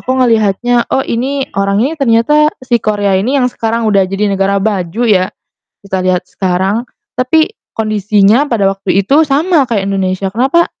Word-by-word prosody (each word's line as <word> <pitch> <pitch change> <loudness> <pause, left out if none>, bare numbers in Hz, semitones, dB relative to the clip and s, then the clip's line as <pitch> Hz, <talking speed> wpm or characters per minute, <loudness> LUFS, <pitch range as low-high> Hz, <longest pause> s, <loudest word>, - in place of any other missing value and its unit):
aku 255 - -6
ngelihatnya, 230 +2 +1
"Oh, 265 - 0
ini 265 +4 -2
orang 200 +2 0
ini 290 - -1
tuh 320 - -10
ternyata" 230 +6 +3 0.3
si 240 -2 +1
Korea 205 -2 0
ini 255 +7 0
yang 260 - +2
sekarang 230 0 -2
udah 200 -3 +2
jadi 200 +1 -1
negara 195 0 0
baju 195 0 -2
ya, 185 -5 +2 0.5
kita 190 -2 -3
lihat 180 -1 -1
sekarang, 190 +5 -1 0.3
"tapi 315 +10 +1 0.2
kondisinya 215 +3 +2
pada 210 -7 +1
waktu 195 0 0
itu 275 +10 +3
sama 300 +1 +2
kayak 200 -4 -1
Indonesia. 190 0 -1
Kenapa 270 +9 +2
215 Hz, 165 wpm, -13 LUFS, 195-250 Hz, 0.5 s, ternyata